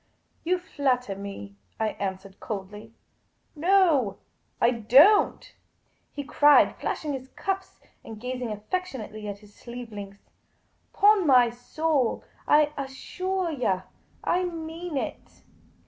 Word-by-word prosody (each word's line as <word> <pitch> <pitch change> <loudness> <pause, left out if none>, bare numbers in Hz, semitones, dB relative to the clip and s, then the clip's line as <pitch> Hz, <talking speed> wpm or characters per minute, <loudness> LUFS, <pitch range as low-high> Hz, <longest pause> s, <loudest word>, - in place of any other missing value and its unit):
" - - -42
You 360 +2 +1
flatter 255 - -1
me," 200 0 -8 0.2
I 220 -1 +1
answered, 195 -1 -6
coldly. 210 +2 -7 0.3
" - - -44
No, 320 - +4 0.4
I 235 - +4
don't," 260 - +4 0.6
he 285 - -5
cried, 295 +1 +5
flashing 300 -2 -3
his 260 -1 -6
cuffs 385 +6 -4 0.2
and 220 -2 -9
gazing 250 -1 -4
affectionately 215 - -5
at 205 -1 -5
his 205 - -20
sleeve 240 0 -9
links. 200 -1 -10 0.3
" - - -43
'Pon 410 -3 +4
my 250 -3 +6
soul, 270 +2 -1 0.2
I 300 0 +4
assuah 365 +7 -3
yah, 190 -8 0 0.4
I 360 +1 +1
mean 330 -1 -5
it. - - -6
255 Hz, 125 wpm, -26 LUFS, 215-325 Hz, 0.6 s, my